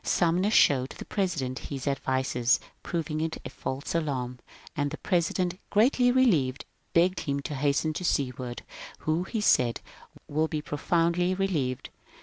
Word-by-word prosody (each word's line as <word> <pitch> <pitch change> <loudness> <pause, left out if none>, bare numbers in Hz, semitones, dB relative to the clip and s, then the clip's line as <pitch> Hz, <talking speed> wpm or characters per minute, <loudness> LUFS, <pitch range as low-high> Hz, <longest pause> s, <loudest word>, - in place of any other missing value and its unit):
Sumner 180 +3 +2
showed 135 - +4
the - - -7
President 155 -10 -1
his 135 -2 -5
advices 130 -2 +1 0.2
proving 155 -2 -2
it 160 0 -2
a - - -6
false 135 +2 -4
alarm, 130 -6 -2 0.4
and 145 -1 0
the 155 - -6
President, 180 0 0
greatly 245 +3 +4
relieved, 170 - +2 0.3
begged 180 +2 +3
him 140 -1 -2
to 145 - -5
hasten 145 +3 +1
to 180 - -4
Seward, 125 -6 -1 0.4
who, 160 +3 0
he 220 +2 -2
said, 120 - +3 0.4
^^ - - -14
will 155 +2 +1
be 155 - -2
pro 150 0 -5
foundly 175 +3 +2
relieved." 155 -10 -1
155 Hz, 150 wpm, -28 LUFS, 135-180 Hz, 0.4 s, showed